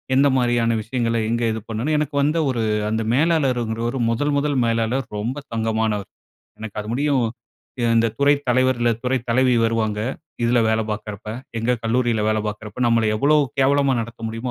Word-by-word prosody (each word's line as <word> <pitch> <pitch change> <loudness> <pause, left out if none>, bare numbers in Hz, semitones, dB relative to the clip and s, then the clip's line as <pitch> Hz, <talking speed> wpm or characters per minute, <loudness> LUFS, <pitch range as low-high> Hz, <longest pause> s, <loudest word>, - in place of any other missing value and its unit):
எந்த 140 +2 +5
மாரியான 120 -2 +2
விஷயங்கள 115 0 -1
எங்க 120 0 0
இது 110 - -3
பண்ணணும்? 125 +8 -1
எனக்கு 150 -1 -2
வந்து 150 +4 +1
ஒரு 120 -3 -1 0.3
அந்த 110 +1 -1
மேலாளர்ங்கிறவர் 125 -6 +1
முதல் 145 +5 0
முதல் 140 -1 0
மேலாளர் 115 +3 0
ரொம்ப 120 +7 -3 0.2
தங்கமானவர். 110 -2 -1 0.5
எனக்கு 110 -1 -8
அது 105 - -6
முடியும் 140 -2 +1 0.7
இந்த 115 0 +4
துறை 140 +1 +5 0.2
தலைவர், 130 0 +2
இல்ல 120 - +3
துறைத் 125 -1 -1
தலைவி 130 +2 +3
வருவாங்க. 110 -2 0 0.4
இதில 120 +1 +3
வேலை 110 0 +2
பார்க்கிறப்ப, 105 0 -6 0.3
எங்க 120 +2 +1
கல்லூரியில 120 -1 +1
வேலை 110 0 +1
பார்க்கிறப்ப 105 +1 -6
நம்மள 115 -1 +3
எவ்ளோ 145 +7 +3 0.2
கேவலமா 140 0 +3
நடத்த 115 +1 -8
முடியுமோ 115 +3 -4
120 Hz, 155 wpm, -21 LUFS, 110-130 Hz, 0.7 s, எந்த